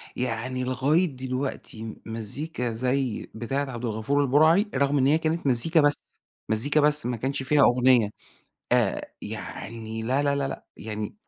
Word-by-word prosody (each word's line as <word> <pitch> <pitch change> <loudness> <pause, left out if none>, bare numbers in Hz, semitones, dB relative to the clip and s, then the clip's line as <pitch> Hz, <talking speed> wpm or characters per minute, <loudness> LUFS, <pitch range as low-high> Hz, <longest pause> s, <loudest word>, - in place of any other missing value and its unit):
يعني 125 +1 -2
لغاية 135 +7 +2
دلوقتي 130 -3 -4
م 110 -1 -6
مزيكا 120 +4 -4
زي 125 +1 -1
بتاعة 135 +5 -2
عبد 120 0 -5
الغفور 115 +6 0
البُرَعي، 155 - +4
رغم 140 +2 +2
إن 135 -1 +3
هي 150 +3 +4
كانت 160 -1 -1
مزيكا 155 +6 +3
بس، 145 0 0 0.3
مزيكا 135 +8 +3
بس، 150 -1 +4
ما 120 -1 -1
كانش 135 +3 -2
فيها 145 +2 +3
أغنية، 125 -3 +4 0.6
آآ، - - +1
يعني 110 +1 -6
لا، 130 +5 +1
لا، 140 -1 +1
لأ، - - -7
يعني 105 -1 -5
130 Hz, 150 wpm, -26 LUFS, 115-145 Hz, 0.6 s, البُرَعي